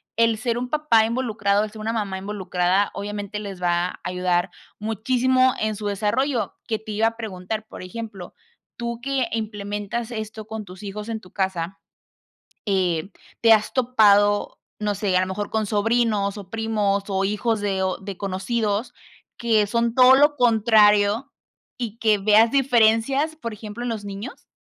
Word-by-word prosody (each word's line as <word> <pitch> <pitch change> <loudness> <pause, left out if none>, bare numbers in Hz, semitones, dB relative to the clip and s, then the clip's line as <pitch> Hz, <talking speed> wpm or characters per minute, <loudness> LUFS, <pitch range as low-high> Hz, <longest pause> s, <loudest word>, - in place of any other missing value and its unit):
el 230 -1 +3
ser 235 +1 -1
un 250 0 -3
papá 300 -8 +3
involucrado, 215 -4 0
el 210 - -9
ser 215 -1 -10
una 225 +1 -1
mamá 200 -4 -2
involucrada 190 -1 0
obviamente 205 0 -5
les 195 -3 -7
va 175 0 +1
a - - -9
ayudar 180 0 0 0.3
muchísimo 255 +4 +2
en 215 0 -1
su 205 0 -5
desarrollo, 215 +3 0
que 220 -2 -1
te 220 0 -8
iba 220 +2 +2
a 230 0 -4
preguntar, 215 0 -5
por - - -10
ejemplo, 200 -2 -8 0.4
tú 235 -1 -4
que 270 -1 0
implementas 210 +1 -4
esto 220 -1 -6
con 220 -1 -6
tus 185 +1 -12
hijos 210 +2 -6
en 220 -1 -3
tu 185 - -17
casa, 190 -2 -2 0.9
eh, 185 -3 0 0.3
¿te 225 -1 +7
has 215 0 +2
topado, 205 -5 +3 0.2
no 210 -1 0
sé, 195 -2 0
a - - +3
lo 185 - -1
mejor 200 +2 -4
con 220 -1 0
sobrinos, 210 -1 +1
o 190 -2 -11
primos, 210 -3 0
o 195 -1 0
hijos 210 +2 0
de 195 -2 -1
o 185 - -1
de 195 -1 -8
conocidos 205 +4 -2 0.4
que 225 -3 +2
son 235 +1 0
todo 255 0 +8
lo 290 +2 +4
contrario 220 0 +4 0.5
y 230 -2 -4
que 215 -2 +3
veas 215 +3 +5
diferencias, 270 +3 +3
por 230 -8 -6
ejemplo, 215 +2 -7
en 245 - -2
los 215 -3 -4
niños? 200 +6 -8
215 Hz, 170 wpm, -23 LUFS, 200-230 Hz, 0.9 s, todo